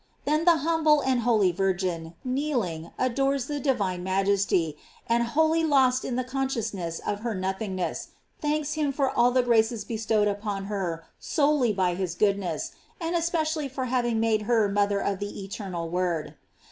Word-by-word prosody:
Then 305 +3 +1
the 340 -2 +6
humble 315 -3 +4
and 260 -2 +1
holy 220 -6 +3
Vir* 195 +2 +1
GLORIES 185 +2 -6
OF - - +1
MAEY. 165 -2 -3
505 170 - -35
gin, 255 - -1
kneeling, 230 - -2
adores 270 +1 +1
the 290 -1 -3
divine 200 -10 0
majesty, 190 -4 +1 0.3
and 235 +1 +2
wholly 315 +7 +2
lost 260 -4 +3
in 245 - -3
the 255 - 0
consciousness 230 -10 -2
of 205 - -1
her 230 0 -3
nothing 190 +1 -3
ness, 185 - -3 0.3
thanks 300 0 -1
him 300 -2 0
for 275 -1 0
all 240 +1 +4
the 255 0 +2
graces 230 -1 +2
bestowed 220 -2 +1
upon 205 -1 -2
her 180 -5 -3
solely 290 -6 +2
by 185 -3 +1
his 180 -1 -3
goodness, 195 -5 0 0.3
and 335 0 -2
especially 320 -3 0
for 260 0 -3
having 240 -2 0
made 220 -1 +2
her 225 -3 +4
mother 200 0 +1
of 200 -1 -1
the 205 -1 -5
eternal 190 -4 -5
Word. 175 -2 -1
225 Hz, 180 wpm, -26 LUFS, 190-270 Hz, 0.3 s, the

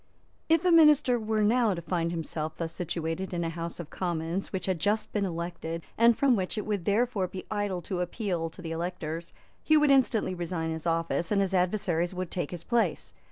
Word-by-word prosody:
If 325 +2 +4
a 360 - +5
minister 300 -6 +6
were 215 -1 0
now 225 -1 +3
to 170 - -5
find 170 -1 -1
himself 160 -2 -4
thus 165 -1 -4
situated 175 +2 -3
in 170 - -1
a 165 - -2
House 165 +1 -5
of 165 -2 -7
Commons 175 +1 -2
which 185 -2 -3
had 185 -3 -1
just 210 +6 0
been 205 -2 +1
elected, 170 -1 -4
and 230 0 +5
from 270 -3 +4
which 190 +1 -2
it 210 - -2
would 205 -5 -2
therefore 210 -2 +1
be 185 +1 -8
idle 205 -4 -1
to 180 +1 -3
appeal 175 -3 -2
to 180 +3 -12
the 165 - -5
electors, 165 -1 -4 0.3
he 310 - +5
would 300 -1 +4
instantly 250 -7 +3
resign 170 -2 -3
his 160 +1 -4
office, 165 +1 0
and 205 - +3
his 195 -1 +1
adversaries 180 -2 +1
would 185 -1 -4
take 175 -6 -2
his 175 -2 -7
place. 235 -1 0
180 Hz, 205 wpm, -28 LUFS, 165-215 Hz, 0.3 s, minister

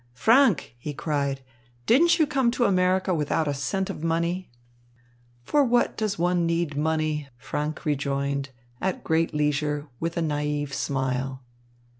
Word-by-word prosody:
Franck," 230 - +4
he 145 +3 -5
cried, 140 -1 -1 0.4
"didn't 335 +8 +5
you 315 - +4
come 265 -4 +1
to 240 0 +1
America 185 -1 +2
without 155 0 0
a 145 - 0
cent 185 +8 -2
of 150 - -6
money?" 170 +3 -1 0.9
"For 290 - +3
what 245 -2 +2
does 215 -3 -1
one 175 0 +1
need 165 -3 -1
money?" 155 -1 0
Franck 150 +6 -4
rejoined, 140 -1 -1 0.3
at 190 0 -2
great 165 0 +1
leisure, 150 0 0
with 165 +1 -3
a - - +1
naïve 150 -2 -1
smile. 130 -1 -2
155 Hz, 140 wpm, -25 LUFS, 145-185 Hz, 0.9 s, didn't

